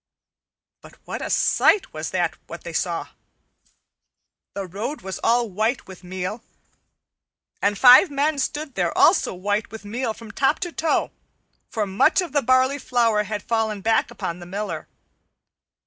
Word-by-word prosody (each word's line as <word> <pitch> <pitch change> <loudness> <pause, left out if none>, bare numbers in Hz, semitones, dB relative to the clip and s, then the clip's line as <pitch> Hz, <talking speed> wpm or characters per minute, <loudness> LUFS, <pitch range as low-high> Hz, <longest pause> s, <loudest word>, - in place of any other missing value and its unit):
But - - -15
what - - -5
a - - -4
sight 410 - +3
was - - -4
that - - -1
which - - -8
they - - -7
saw! - - -2 1.5
The 200 -1 -3
road 210 - -5
was 190 0 -6
all 235 0 +3
white 220 +5 -1
with 190 -1 -12
meal, 185 +4 -5 1.2
and 205 0 +1
five 255 - +8
men 285 +1 0
stood 295 +1 -3
there 175 -5 -1
also 335 - +4
white 205 +3 -1
with 220 0 -10
meal 225 +2 -3
from 225 -1 -11
top 275 +6 +1
to 350 -2 -3
toe, 320 -1 0 0.6
for 220 -3 -1
much 200 - +3
of 355 -5 -2
the 285 0 +2
barley 260 +3 +3
flour 230 -5 +1
had 210 0 -4
fallen 220 -3 -1
back 225 +2 +2
upon 170 +1 -5
the 175 - -10
Miller. 205 +3 -5
225 Hz, 155 wpm, -23 LUFS, 200-265 Hz, 1.5 s, five